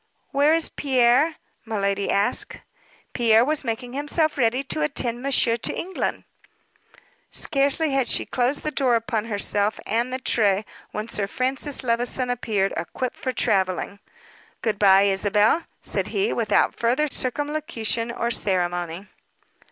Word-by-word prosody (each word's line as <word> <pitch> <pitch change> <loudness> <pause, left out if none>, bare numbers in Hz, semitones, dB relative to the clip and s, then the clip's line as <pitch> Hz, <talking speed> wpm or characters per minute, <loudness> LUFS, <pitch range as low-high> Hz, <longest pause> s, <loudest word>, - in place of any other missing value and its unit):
"Where 285 +2 +3
is 330 - +1
Pierre?" 265 +3 +2 0.3
miladi 200 -3 -1
asked. 200 +1 0 0.6
"Pierre 230 -1 +4
was 305 +1 0
making 245 +1 -4
himself 295 +3 0
ready 250 0 +1
to 155 - -2
attend 235 +10 -1
monsieur 255 -3 +2
to - - -3
England." 375 +2 -3 1.1
Scarcely 285 +2 +1
had 270 -3 +1
she - - +2
closed 255 +3 -1
the 305 - -2
door 265 -4 +2
upon 225 -1 -1
herself 205 -1 +3
and 235 +3 -1
the 255 - -2
tray 210 -5 +1 0.2
when 215 +1 -5
Sir 205 -3 -2
Francis 265 +5 -1
Levison 245 +1 -1
appeared, 215 -5 -1
equipped 170 +10 -4
for 260 - -3
traveling. 195 -4 -1 0.6
"Good 215 -3 -1
bye, 195 -1 +6
Isabel," 205 - +2 0.2
said - - -1
he, 400 +3 -1
without - - +1
further 250 +6 +1
circumlocution 255 -5 -2
or 235 0 -2
ceremony. 175 -2 -1
235 Hz, 135 wpm, -23 LUFS, 205-270 Hz, 1.1 s, bye